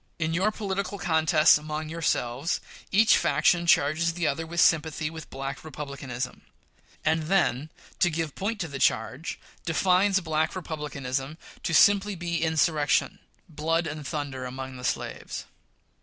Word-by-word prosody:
In 160 0 -1
your 190 +5 +2
political 200 -2 -3
contests 160 -4 +4
among 155 +1 -5
yourselves, 155 -3 -1 0.3
each 215 +3 +6
faction 175 -1 +2
charges 165 +2 +3
the 170 0 -2
other 160 +3 -1
with 170 +1 -3
sympathy 160 -2 +2
with 160 -1 -9
Black 135 0 -5
Republicanism; 140 -5 -6 0.6
and 160 0 +2
then, 160 -6 +1 0.3
to 175 - +4
give 160 -2 -3
point 210 +3 -3
to 170 - -2
the 140 -2 -6
charge, 135 +5 0 0.2
defines 185 +4 +3
Black 160 -2 -1
Republicanism 145 -4 -4 0.2
to 165 - -2
simply 205 +3 +5
be 170 -1 -2
insurrection, 160 -2 +1 0.3
blood, 165 +2 -1
and 150 -2 -5
thunder 140 -4 -4
among 130 +1 -6
the 125 - -9
slaves. - - -3
160 Hz, 140 wpm, -27 LUFS, 145-170 Hz, 0.6 s, each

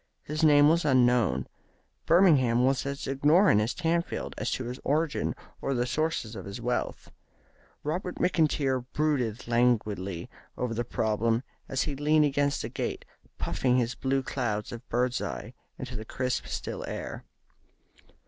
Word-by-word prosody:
His 155 +2 -3
name 145 -2 +7
was 165 +2 +3
unknown. 125 -4 +3 0.6
Birmingham 135 -9 +5
was 135 0 +1
as 140 0 -4
ignorant 145 - +4
as 110 +3 -1
Tamfield 170 0 -1
as - - -2
to 130 - -2
his 125 +2 -6
origin 155 +1 0 0.3
or 135 - -1
the 120 0 +1
sources 130 -5 -1
of 95 - -7
his 100 +4 -6
wealth. 120 +1 -3 0.7
Robert 175 +4 -3
McIntyre 150 -7 +1
brooded 130 -8 0
languidly 105 -7 +1 0.3
over 125 -2 -2
the 120 +1 -1
problem 115 +1 0 0.3
as 135 -1 0
he 145 - -3
leaned 150 +2 +3
against 140 0 0
the - - -4
gate, - - -4 0.3
puffing 125 -1 +1
his 120 -1 +1
blue 135 0 0
clouds 110 -6 -2
of 120 0 -9
bird's 125 +1 0
eye - - -5 0.2
into - - -6
the 110 - -5
crisp, 125 +3 -2
still - - -4
air. - - -5
130 Hz, 150 wpm, -28 LUFS, 120-150 Hz, 0.7 s, name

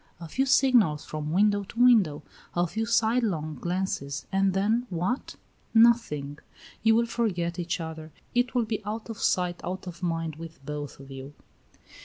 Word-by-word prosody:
A 170 - -7
few 265 - 0
signals 235 - +4
from 155 0 -4
window 205 +3 +3
to 230 +4 -9
window; 205 -12 +5 0.3
a 175 0 +3
few 220 +7 -3
sidelong 220 -9 +1
glances, 175 -6 -2
and 195 -1 +2
then 220 +5 +1
what? 185 +8 -2 0.4
Nothing. 185 -12 +3 0.4
You 225 0 +5
will 235 +1 +3
forget 180 -7 -1
each 175 +1 -2
other. 160 -1 -7 0.2
It 245 +1 +1
will 240 -2 +2
be 215 -1 -3
out 215 +2 -5
of 220 - -8
sight 180 -1 0
out 185 +2 -4
of 175 -1 -8
mind 165 -3 -2
with 160 -4 -10
both 145 -1 -6
of 135 0 -12
you." 135 +2 -9
180 Hz, 165 wpm, -27 LUFS, 160-225 Hz, 0.4 s, window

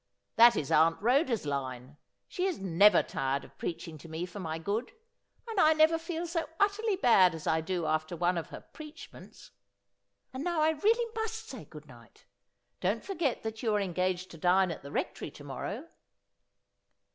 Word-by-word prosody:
That 235 0 +8
is 140 - -2
Aunt 165 +2 +4
Ehoda's 245 - +2
line. 130 -1 -4 0.3
She 365 - -2
is 370 - -2
never 195 +2 +5
tired 135 +1 -2
of - - -18
preaching 165 -2 -5
to 165 - -12
me 160 +2 -4
for 180 +3 -9
my 160 -3 -4
good, 205 +8 -3 0.5
and 445 -4 -2
I 310 -1 +6
never 315 +1 +4
feel 335 +1 -4
so 330 -2 -3
utterly 410 +1 +2
bad 195 - +5
as 160 - -8
I 160 0 +2
do 175 0 -2
after 155 +2 -1
one 175 +2 +1
of 170 - -4
her - - -9
preachments. 310 +1 -13 0.8
And 260 +2 -4
now 345 -1 -1
I 310 +1 +4
really 450 +8 +1
must 445 0 -4
say 255 - -9
good 150 +1 -12
night. 120 -6 -18 0.5
Don't 205 +5 -1
forget 340 -10 -1
that 220 0 -5
you 220 -3 +1
are - - +2
engaged 185 -1 -1
to 165 - -11
dine 180 +2 +3
at 165 - -7
the 140 - -10
Rectory - - -3
to 145 - -13
morrow.' 195 - -6
200 Hz, 180 wpm, -30 LUFS, -, 0.8 s, That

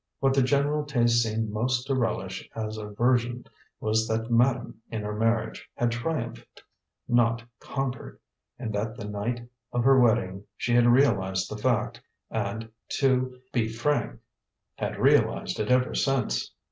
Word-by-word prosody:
What 135 -1 +3
the 135 - +4
general 145 +3 +2
taste 120 -5 +3
seemed 110 -1 -1
most 120 +4 0
to 135 - 0
relish 105 -6 -2
as 110 -1 -3
a 105 - -6
version 120 +2 +1 0.3
was 110 +1 +1
that 115 +1 -2
madame 120 0 +2
in 110 -2 -4
her 105 0 -3
marriage 115 +1 -1
had 120 -1 +1
triumphed, 120 0 -4 0.4
not 115 -1 +2 0.2
conquered; 135 -2 -4 0.4
and 115 -4 -4
that 110 +3 -2
the - - -6
night 115 +4 -3 0.2
of 120 -1 0
her 135 +1 +6
wedding 100 -5 +2
she 120 - -1
had 120 0 +5
realized 95 -8 +3
the 105 0 -5
fact, 120 -2 0 0.3
and, 110 +1 -3 0.3
to 130 -2 +1
be 115 -3 +2
frank, 115 - -1 0.6
had - - -3
realized - - +2
it 105 - -1
ever 125 0 +3
since. 130 - 0
120 Hz, 150 wpm, -27 LUFS, 110-125 Hz, 0.6 s, her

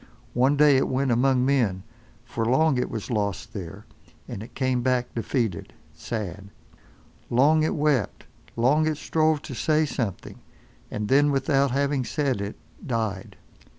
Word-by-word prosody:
One 130 +4 +3
day 145 -2 +6
it 130 - +1
went 130 0 0
among 125 +1 +3
men, 115 -9 +1 0.4
for 115 -1 -3
long 130 +4 +3
it - - -1
was 110 +3 -5
lost 100 -4 -2
there, 95 +1 -8 0.4
and 100 - -6
it 110 - -11
came 130 -2 0
back 125 0 0
defeated, 115 -5 -2 0.2
sad. 100 +3 -6 0.8
Long 145 +6 +4
it 155 - 0
wept, 145 -8 0 0.3
long 145 +7 +3
it 155 -2 -1
strove 155 -1 +1
to - - -7
say 155 +6 +1
something, 115 -9 -4 0.5
and 105 0 -3
then 145 +4 +4
without 140 0 +2
having 140 +1 0
said 135 -5 -1
it—died. 105 0 -5
130 Hz, 145 wpm, -25 LUFS, 110-140 Hz, 0.8 s, day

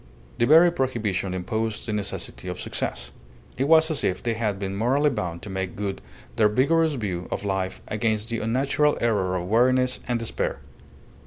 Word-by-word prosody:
The 120 - +3
very 165 +3 +7
prohibition 110 - -1
imposed 110 +4 -2
the 110 - -3
necessity 105 -1 -4
of - - -4
success. - - -4 0.4
It 135 - 0
was 160 +1 +5
as 155 - -2
if 90 - -1
they 115 - 0
had 110 -3 -1
been 95 0 -4
morally 135 +8 +2
bound 85 -8 -4
to - - -7
make 95 -1 -3
good 100 -1 -4 0.4
their 105 -1 +5
vigorous 155 +7 +2
view 95 -7 -3
of - - -4
life 95 -1 -2
against 110 0 -1
the 115 -1 -2
unnatural 135 +6 +1
error 100 -6 +1
of 90 -1 -3
weariness 125 +4 +3
and 120 -1 +1
despair. 115 -1 -2
110 Hz, 175 wpm, -25 LUFS, 100-130 Hz, 0.4 s, very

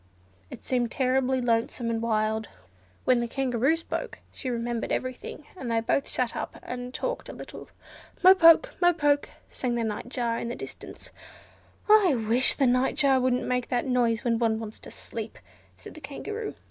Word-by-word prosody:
It - - -11
seemed 245 -2 0
terribly 260 +1 +1
lonesome 230 0 0
and 225 -1 -1
wild. 220 -1 0 0.6
When 255 -1 +4
the 235 - -1
Kangaroo 260 +3 +1
spoke 330 - -5
she 260 - -5
remembered 235 -1 -2
every 255 0 -1
thing, 290 +3 -10
and 255 -10 -5
they 230 - +2
both 250 +5 0
sat 250 -2 -1
up - - -5
and 245 0 -6
talked - - -4
a - - -7
little. - - -10 0.5
"Mo 370 +1 +10
poke! 340 +7 +6
mo 350 0 +5
poke!" 290 -3 +1 0.2
sang 245 -2 -2
the 235 - 0
Nightjar 230 +2 -2
in - - -4
the 240 - -4
distance. - - -10 0.8
"I 415 -8 +6
wish 245 +4 +3
the 275 - +2
Nightjar 260 +2 +3
wouldn't 250 0 +1
make 250 -1 -1
that 245 0 -1
noise 240 -4 +1
when 230 -2 +1
one 225 -2 +2
wants 220 -1 -8
to - - -11
sleep," - - -7 0.4
said - - -11
the 310 - -12
Kangaroo. 425 +11 -6
250 Hz, 175 wpm, -27 LUFS, 230-275 Hz, 0.8 s, Mo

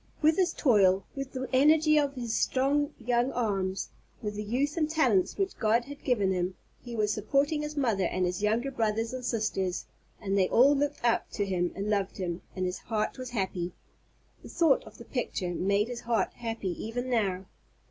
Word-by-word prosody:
With 315 +1 +4
his 370 -2 +3
toil, 195 - +4
with 275 -1 -5
the 260 -1 -3
energy 305 +3 +5
of 285 -1 0
his 240 -3 -3
strong 285 +3 +1
young 240 +2 +1
arms, 195 -5 -1 0.3
with 210 -1 -2
the 210 - -4
youth 265 +8 -1
and 310 -3 +1
talents 255 - +2
which 390 -1 -1
God 225 +2 +2
had 285 +1 -10
given 210 -7 +2
him, 180 0 -1 0.3
he 240 -2 -7
was 210 -1 +1
supporting 280 +8 +1
his 300 0 -5
mother 225 -9 +1
and 185 +1 0
his 180 +2 -2
younger 225 +6 +1
brothers 225 -1 -1
and 255 0 -5
sisters; 210 -6 -1 0.3
and 195 -2 -2
they 190 -2 +3
all 275 +5 +6
looked 285 -2 -1
up 235 - +2
to 205 - 0
him 180 -2 0
and 200 +2 -3
loved 200 -2 0
him, 175 -2 -3
and 185 -1 -1
his 180 0 -3
heart 215 +3 -2
was 255 -1 -5
happy. 190 -6 -2 0.7
The - - -11
thought 325 -5 +3
of - - -13
the 235 - -11
picture 190 -9 -3
made 200 +4 +1
his 245 -1 -6
heart 230 -1 0
happy 225 -5 -4
even 245 +3 -3
now. 195 -6 0
230 Hz, 195 wpm, -29 LUFS, 195-270 Hz, 0.7 s, all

